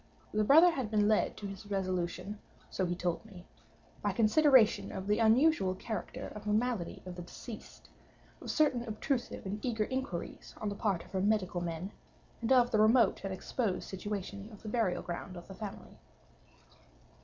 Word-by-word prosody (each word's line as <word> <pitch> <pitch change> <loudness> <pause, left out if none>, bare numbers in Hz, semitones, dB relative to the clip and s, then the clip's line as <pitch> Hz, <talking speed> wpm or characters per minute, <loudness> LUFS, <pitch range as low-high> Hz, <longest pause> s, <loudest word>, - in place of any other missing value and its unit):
The 215 0 +2
brother 320 +10 +7
had 265 -9 -3
been 210 -1 +3
led 215 0 +2
to 205 - -7
his 195 +1 -7
resolution 185 +1 -2 0.3
(so 185 - 0
he 175 - -1
told 175 -1 -2
me) 190 -5 -13 0.6
by - - +1
consideration 245 +1 +5
of 190 -1 -5
the 210 +2 +2
unusual 225 - +4
character 220 +3 -5
of 210 - -9
the 210 - +1
malady 220 -5 -1
of 180 - -6
the 175 - -7
deceased, 210 +5 -10 0.5
of - - -7
certain 290 -6 +3
obtrusive 240 +2 -3
and 205 +2 -4
eager 225 -4 0
inquiries 260 -8 -5
on 210 - -2
the 200 - -4
part 195 -5 -1
of - - -18
her 190 - -1
medical 200 -3 +1
men, 170 +3 -4 0.5
and 230 +2 -1
of 245 -2 +5
the 215 - +3
remote 225 +3 +5
and 195 - -3
exposed 190 +1 -2
situation 200 +1 -5
of 210 - -13
the 215 - -5
burial 215 -6 0
ground 175 +1 -6
of 175 - -10
the 195 - -9
family. 200 +1 -8
210 Hz, 180 wpm, -32 LUFS, 190-230 Hz, 0.6 s, brother